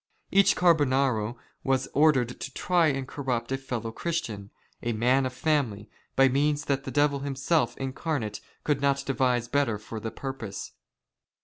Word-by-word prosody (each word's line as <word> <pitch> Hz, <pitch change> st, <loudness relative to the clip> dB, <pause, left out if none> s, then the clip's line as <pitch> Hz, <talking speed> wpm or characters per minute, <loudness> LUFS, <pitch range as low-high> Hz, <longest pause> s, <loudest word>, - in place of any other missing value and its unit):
Each 200 Hz, 0 st, +5 dB
Carbonaro 135 Hz, -9 st, +2 dB, 0.3 s
was 135 Hz, -1 st, +1 dB
moreover 150 Hz, -2 st, +5 dB
ordered 120 Hz, +1 st, -9 dB
to 135 Hz, -, -6 dB
try 175 Hz, -3 st, +3 dB
and 135 Hz, -3 st, -1 dB
corrupt 130 Hz, -4 st, -3 dB
a 135 Hz, -, +1 dB
fellow 120 Hz, -4 st, -4 dB
Christian, 115 Hz, -10 st, -3 dB, 0.3 s
a 120 Hz, -, -1 dB
man 125 Hz, +4 st, +3 dB
of 130 Hz, -, -7 dB
family, 125 Hz, -8 st, -1 dB, 0.2 s
by 135 Hz, 0 st, +6 dB
means 145 Hz, +3 st, +1 dB
that 140 Hz, -1 st, -1 dB
the -, -, -4 dB
devil 145 Hz, -1 st, +2 dB
himself 140 Hz, +4 st, 0 dB
incarnate 135 Hz, -5 st, -3 dB, 0.2 s
could 145 Hz, -2 st, 0 dB
not 140 Hz, 0 st, +1 dB
devise 125 Hz, -3 st, +1 dB
better 125 Hz, -4 st, +1 dB
for 110 Hz, +2 st, -7 dB
the 110 Hz, -, -4 dB
purpose. 115 Hz, -3 st, -6 dB
135 Hz, 155 wpm, -27 LUFS, 120-145 Hz, 0.3 s, by